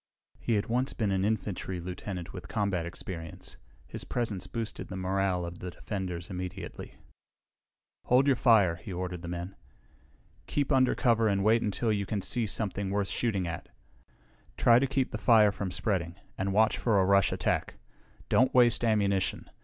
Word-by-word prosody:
He 115 Hz, -, 0 dB
had 100 Hz, 0 st, 0 dB
once 125 Hz, +4 st, 0 dB
been 105 Hz, -4 st, -1 dB
an 95 Hz, 0 st, +1 dB
infantry 100 Hz, -3 st, -2 dB
lieutenant 90 Hz, 0 st, -6 dB
with 90 Hz, -2 st, -8 dB
combat 100 Hz, -6 st, -1 dB
experience. 85 Hz, -2 st, -7 dB, 0.3 s
His -, -, -6 dB
presence 105 Hz, -7 st, -3 dB
boosted 115 Hz, -2 st, -4 dB
the 95 Hz, -, -7 dB
morale 95 Hz, -1 st, 0 dB
of 85 Hz, 0 st, -8 dB
the 90 Hz, -, -5 dB
defenders 90 Hz, -1 st, -5 dB
immediately. 90 Hz, 0 st, -6 dB, 1.1 s
"Hold 125 Hz, +2 st, +4 dB
your 140 Hz, -2 st, +4 dB
fire," 105 Hz, -9 st, +4 dB
he 85 Hz, -, -9 dB
ordered 90 Hz, -1 st, -4 dB
the 85 Hz, -, -7 dB
men. 85 Hz, +2 st, -5 dB, 0.9 s
"Keep 145 Hz, 0 st, -1 dB
under 130 Hz, -2 st, +4 dB
cover 115 Hz, -4 st, +3 dB
and 100 Hz, -2 st, +1 dB
wait 110 Hz, +2 st, +4 dB
until 110 Hz, +2 st, 0 dB
you 100 Hz, -1 st, -2 dB
can 105 Hz, -, -1 dB
see 120 Hz, -3 st, +1 dB
something 100 Hz, -2 st, -2 dB
worth 100 Hz, 0 st, 0 dB
shooting 100 Hz, -7 st, 0 dB
at. 85 Hz, -, -6 dB, 0.9 s
Try 120 Hz, 0 st, +6 dB
to 135 Hz, -, +1 dB
keep 135 Hz, -1 st, 0 dB
the 110 Hz, -, -4 dB
fire 105 Hz, 0 st, +5 dB
from 100 Hz, -1 st, -4 dB
spreading, 90 Hz, -2 st, -1 dB, 0.2 s
and 95 Hz, +1 st, -2 dB
watch 110 Hz, +2 st, +3 dB
for 110 Hz, -4 st, +2 dB
a 95 Hz, -, +3 dB
rush 100 Hz, 0 st, +4 dB
attack. -, -, -1 dB, 0.5 s
Don't 130 Hz, +1 st, +3 dB
waste 120 Hz, -2 st, +5 dB
ammunition! 100 Hz, -4 st, +1 dB
100 Hz, 170 wpm, -29 LUFS, 90-115 Hz, 1.1 s, Try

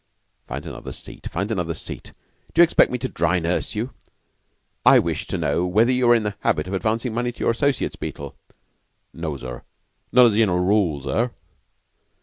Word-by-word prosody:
"Find -, -, -6 dB
another -, -, -7 dB
seat -, -, -7 dB
find 100 Hz, +5 st, -3 dB
another 90 Hz, -6 st, -1 dB
seat. -, -, -8 dB, 0.4 s
D'you 170 Hz, -, +8 dB
expect 170 Hz, -, +4 dB
me 125 Hz, -, -1 dB
to 130 Hz, +2 st, -3 dB
dry 95 Hz, -, +1 dB
nurse 85 Hz, +5 st, -1 dB
you? 115 Hz, +5 st, -3 dB, 0.9 s
I -, -, +8 dB
wish -, -, -1 dB
to -, -, -2 dB
know 85 Hz, -, 0 dB
whether 110 Hz, +7 st, +3 dB
you 125 Hz, -1 st, +2 dB
are 120 Hz, -, +7 dB
in 115 Hz, -, +1 dB
the 105 Hz, -1 st, -3 dB
habit 75 Hz, +2 st, 0 dB
of 95 Hz, -, -5 dB
advancing 110 Hz, +4 st, -1 dB
money 120 Hz, +1 st, -1 dB
to 120 Hz, -, -20 dB
your -, -, +2 dB
associates, 140 Hz, +3 st, 0 dB
Beetle?" 70 Hz, -1 st, -6 dB, 0.8 s
"No, 80 Hz, -4 st, -4 dB
sir; 60 Hz, -1 st, -7 dB, 0.5 s
not 125 Hz, 0 st, +7 dB
as 115 Hz, -, +4 dB
a -, -, 0 dB
general 100 Hz, -6 st, +3 dB
rule, 90 Hz, -6 st, +2 dB
sir." 115 Hz, -, 0 dB
105 Hz, 185 wpm, -23 LUFS, 85-120 Hz, 0.9 s, D'you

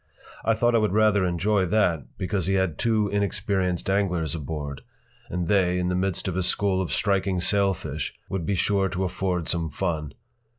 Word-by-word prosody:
I 115 Hz, -, +2 dB
thought 120 Hz, +2 st, +2 dB
I 115 Hz, -, +5 dB
would 105 Hz, -3 st, +1 dB
rather 105 Hz, -2 st, +4 dB
enjoy 95 Hz, +3 st, +1 dB
that, 85 Hz, -, 0 dB
because 95 Hz, -1 st, -1 dB
he 95 Hz, -, +2 dB
had 95 Hz, -5 st, 0 dB
two 110 Hz, -2 st, +2 dB
inexperienced 100 Hz, -3 st, -1 dB
anglers 90 Hz, -6 st, 0 dB
aboard, 75 Hz, -2 st, -5 dB, 0.5 s
and 90 Hz, -1 st, -2 dB
they, 90 Hz, -2 st, +3 dB
in 90 Hz, 0 st, 0 dB
the 90 Hz, -, 0 dB
midst 95 Hz, 0 st, -1 dB
of 90 Hz, -, -2 dB
a 95 Hz, -, +1 dB
school 95 Hz, +1 st, +1 dB
of 95 Hz, -, -3 dB
striking 95 Hz, -3 st, +1 dB
sailfish, 90 Hz, -6 st, 0 dB, 0.2 s
would 95 Hz, -3 st, -3 dB
be 100 Hz, +5 st, 0 dB
sure 95 Hz, +1 st, +1 dB
to 95 Hz, 0 st, -2 dB
afford 90 Hz, -2 st, -1 dB
some 85 Hz, -2 st, -1 dB
fun. 80 Hz, -2 st, -3 dB
95 Hz, 180 wpm, -25 LUFS, 85-100 Hz, 0.5 s, I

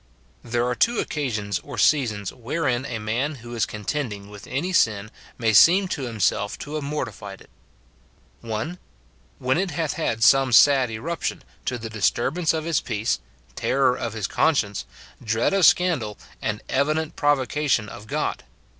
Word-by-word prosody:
There 120 Hz, 0 st, 0 dB
are 125 Hz, -, 0 dB
two 235 Hz, -, +2 dB
occasions 110 Hz, -9 st, -2 dB
or 145 Hz, -, -9 dB
seasons 110 Hz, -9 st, +2 dB
wherein 130 Hz, 0 st, -1 dB
a 120 Hz, -4 st, -3 dB
man 120 Hz, +8 st, -2 dB
who 120 Hz, -, -8 dB
is 115 Hz, -, 0 dB
contending 105 Hz, -2 st, -4 dB
with 105 Hz, -1 st, -11 dB
any 175 Hz, +7 st, -2 dB
sin 110 Hz, -, +2 dB, 0.3 s
may 115 Hz, -3 st, +1 dB
seem 180 Hz, -, +7 dB
to 140 Hz, -7 st, -3 dB
himself 105 Hz, -2 st, 0 dB
to 150 Hz, -, -8 dB
have 155 Hz, -1 st, -2 dB
mortified 120 Hz, -9 st, -5 dB
it: -, -, -19 dB, 0.5 s
— -, -, -34 dB
[1.] 120 Hz, +11 st, -4 dB, 0.6 s
When 130 Hz, +5 st, +1 dB
it 190 Hz, 0 st, 0 dB
hath 165 Hz, -4 st, -2 dB
had 115 Hz, -8 st, -1 dB
some 135 Hz, 0 st, +5 dB
sad 135 Hz, 0 st, +6 dB
eruption, 150 Hz, +10 st, -4 dB, 0.2 s
to 125 Hz, -, -1 dB
the 115 Hz, -1 st, -7 dB
dis 110 Hz, -2 st, +3 dB
turbance 160 Hz, +7 st, 0 dB
of 160 Hz, -1 st, -2 dB
his 165 Hz, -3 st, +1 dB
peace, 110 Hz, -, -1 dB, 0.3 s
terror 130 Hz, -, +2 dB
of 115 Hz, -3 st, -4 dB
his 110 Hz, -3 st, -3 dB
conscience, 105 Hz, -7 st, +1 dB, 0.4 s
dread 115 Hz, -, +1 dB
of 195 Hz, -3 st, +6 dB
scandal, 145 Hz, -, +2 dB, 0.2 s
and 105 Hz, 0 st, -3 dB
evident 155 Hz, +3 st, 0 dB
provocation 145 Hz, -4 st, +1 dB
of 105 Hz, +1 st, -10 dB
God. -, -, -2 dB
125 Hz, 165 wpm, -24 LUFS, 110-150 Hz, 0.6 s, seem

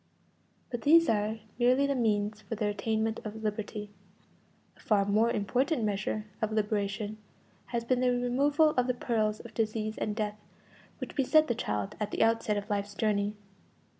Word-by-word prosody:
But 240 Hz, -2 st, -3 dB
these 330 Hz, +5 st, +6 dB
are 215 Hz, 0 st, +1 dB, 0.2 s
merely 250 Hz, +3 st, +4 dB
means 215 Hz, -3 st, 0 dB
for 225 Hz, -, -5 dB
the 215 Hz, 0 st, -1 dB
attainment 220 Hz, +2 st, -1 dB
of 220 Hz, +1 st, -7 dB
liberty. 210 Hz, -1 st, -3 dB, 0.8 s
A -, -, -25 dB
far 205 Hz, -2 st, +2 dB
more 215 Hz, +3 st, +3 dB
important 245 Hz, -, 0 dB
measure 210 Hz, +1 st, -1 dB, 0.2 s
of 220 Hz, -1 st, 0 dB
liberation 210 Hz, 0 st, -1 dB, 0.5 s
has 235 Hz, -1 st, -2 dB
been 250 Hz, +1 st, +2 dB
the 255 Hz, 0 st, +3 dB
removal 275 Hz, +5 st, +3 dB
of 250 Hz, -3 st, +1 dB
the 250 Hz, -, 0 dB
perils 215 Hz, -3 st, 0 dB
of 235 Hz, -, -12 dB
disease 215 Hz, -1 st, -2 dB
and 210 Hz, -, -2 dB
death 210 Hz, -1 st, -2 dB, 0.6 s
which -, -, -7 dB
beset 310 Hz, +3 st, +4 dB
the 240 Hz, -, +1 dB
child 105 Hz, -, -2 dB
at 210 Hz, -1 st, -1 dB
the -, -, +1 dB
outset 225 Hz, -2 st, +2 dB
of 205 Hz, 0 st, -4 dB
life's 205 Hz, -1 st, -2 dB
journey. 205 Hz, -1 st, 0 dB
220 Hz, 165 wpm, -30 LUFS, 210-240 Hz, 0.8 s, these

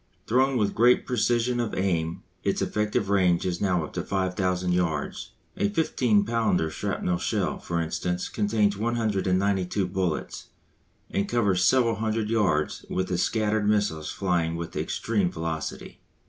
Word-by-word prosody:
Thrown 130 Hz, +3 st, +2 dB
with 105 Hz, -3 st, +1 dB
great 120 Hz, +2 st, +4 dB
precision 120 Hz, 0 st, +1 dB
of 115 Hz, -2 st, -2 dB
aim 85 Hz, -4 st, -1 dB, 0.2 s
its -, -, 0 dB
effective 105 Hz, -2 st, -1 dB
range 90 Hz, -3 st, +3 dB
is 90 Hz, -1 st, -2 dB
now 90 Hz, -4 st, +1 dB
up -, -, -8 dB
to -, -, -2 dB
5000 90 Hz, -1 st, -1 dB
yards. 85 Hz, -5 st, -2 dB, 0.2 s
A 100 Hz, -, +1 dB
15 110 Hz, -4 st, +2 dB
pounder 110 Hz, -8 st, +1 dB
shrapnell 90 Hz, -1 st, -2 dB
shell, -, -, -1 dB
for 85 Hz, 0 st, -2 dB
instance, 90 Hz, +2 st, -2 dB
contains 105 Hz, -1 st, +1 dB
192 100 Hz, -4 st, 0 dB
bullets, 90 Hz, -3 st, -3 dB, 0.6 s
and 100 Hz, +1 st, -1 dB
covers 100 Hz, -7 st, +2 dB
several 115 Hz, 0 st, +3 dB
hundred 110 Hz, 0 st, -1 dB
yards 90 Hz, -10 st, +1 dB
with 95 Hz, 0 st, -1 dB
the 90 Hz, -, 0 dB
scattered 110 Hz, 0 st, +1 dB
missiles 100 Hz, -8 st, 0 dB
flying 85 Hz, -4 st, 0 dB
with 85 Hz, 0 st, -6 dB
extreme 100 Hz, -6 st, -1 dB
velocity. 80 Hz, -2 st, -5 dB
100 Hz, 140 wpm, -26 LUFS, 90-110 Hz, 0.6 s, great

